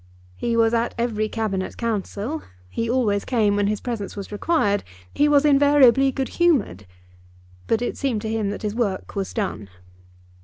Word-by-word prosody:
He 230 - -1
was 225 0 +3
at 235 0 0
every 220 -2 -1
Cabinet 205 -5 -3
Council; 230 +5 -3 0.3
he 230 - -3
always 220 -5 +1
came 215 -5 +1
when 205 0 +1
his 210 0 -1
presence 230 -5 -5
was 200 0 -7
required; 205 -3 +1 0.3
he 295 +1 +3
was 290 0 +4
invariably 275 -2 +5
good 265 0 -3
humoured; 260 - +1 0.8
but 225 +1 +1
it - - -3
seemed 245 -7 -1
to 220 - -3
him 220 -3 -1
that 205 - -5
his 210 -1 -2
work 215 -5 -2
was 195 -1 -3
done. 150 - -3
225 Hz, 165 wpm, -23 LUFS, 205-260 Hz, 0.8 s, invariably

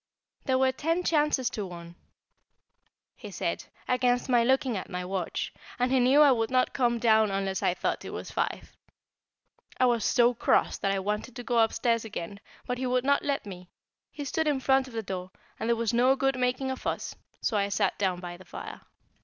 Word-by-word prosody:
There 260 -1 +2
were 260 0 +3
ten 330 +6 -1
chances 300 -6 +2
to 210 - -4
one, 170 -2 -9 1.2
he - - -10
said, - - -3 0.2
against 250 0 +1
my 240 -2 +4
looking 260 -1 +2
at 190 - -5
my 180 -1 -4
watch, 185 -2 -3 0.2
and 250 0 +1
he 265 - +4
knew 260 +4 +5
I 285 - +6
would 225 -3 +1
not 255 -1 +2
come 240 -2 +1
down 220 -2 +4
unless 195 -1 -2
I 175 - +1
thought - - -2
it - - -7
was - - -7
five. - - -3 1.0
I 255 - +5
was 235 -3 +2
so 240 +3 +4
cross 235 - +1
that 195 - 0
I 195 - 0
wanted 210 +5 -3
to 245 - -6
go 240 -1 +1
upstairs 230 +1 +2
again, 200 -3 -6 0.3
but 250 0 -3
he 260 - -1
would 250 0 +1
not 280 0 +3
let 280 -4 -1
me; 180 -3 -9 0.4
he 290 - -7
stood 320 +3 -1
in 290 -3 +1
front 265 0 +2
of 245 - -12
the 225 - -2
door, 185 -1 -5 0.3
and 225 - -2
there 235 - +4
was 230 0 -1
no 250 +3 +4
good 270 0 +1
making 255 +1 0
a - - -2
fuss, - - -4 0.2
so 225 - -1
I 200 -1 +1
sat 200 - 0
down 185 -3 0
by 175 -1 -7
the 185 - -14
fire. - - -8
240 Hz, 210 wpm, -28 LUFS, 200-260 Hz, 1.2 s, I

